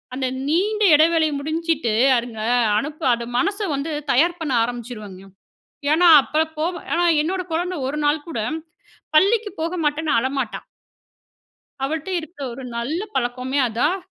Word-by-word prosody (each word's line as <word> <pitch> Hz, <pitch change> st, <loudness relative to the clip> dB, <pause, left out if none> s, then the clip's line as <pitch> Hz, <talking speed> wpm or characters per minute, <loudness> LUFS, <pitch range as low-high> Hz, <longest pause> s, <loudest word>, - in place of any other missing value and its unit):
அந்த 260 Hz, -1 st, -1 dB, 0.2 s
நீண்ட 410 Hz, +7 st, +1 dB
எடைவேளை 320 Hz, +1 st, +4 dB
முடிஞ்சிட்டு, 315 Hz, -5 st, -1 dB, 0.2 s
அதுங்க 235 Hz, -2 st, -5 dB, 0.4 s
அனுப்ப 300 Hz, +5 st, -4 dB
அது 235 Hz, 0 st, -3 dB
மனச 400 Hz, -, 0 dB, 0.2 s
வந்து 280 Hz, +4 st, -3 dB, 0.2 s
தயார் 340 Hz, +7 st, +3 dB
பண்ண 315 Hz, -4 st, -3 dB
ஆரம்பிச்சுருவங்க. 225 Hz, -5 st, -6 dB, 0.7 s
ஏன்னா, 345 Hz, +3 st, +5 dB, 0.2 s
அப்ப 310 Hz, +3 st, 0 dB
போவ 340 Hz, +4 st, 0 dB, 0.2 s
ஏன்னா, 345 Hz, +1 st, +2 dB, 0.2 s
என்னோட 370 Hz, +4 st, -1 dB
கொழந்த 355 Hz, +1 st, -1 dB
ஒரு 290 Hz, -, -3 dB
நாள் 295 Hz, 0 st, +1 dB
கூட, 315 Hz, -, -4 dB, 0.8 s
பள்ளிக்கு 415 Hz, +5 st, +4 dB
போக 335 Hz, +3 st, -2 dB
மாட்டேன்னு 295 Hz, +1 st, 0 dB
அழமாட்டான். 260 Hz, -1 st, -3 dB, 1.2 s
அவள்ட்ட 315 Hz, +4 st, -3 dB
இருக்குற 315 Hz, -3 st, -9 dB
ஒரு 265 Hz, -, -9 dB
நல்ல 270 Hz, +9 st, -2 dB
பழக்கமே 255 Hz, +1 st, -1 dB
அதான். 295 Hz, -, 0 dB
305 Hz, 130 wpm, -21 LUFS, 255-335 Hz, 1.2 s, ஏன்னா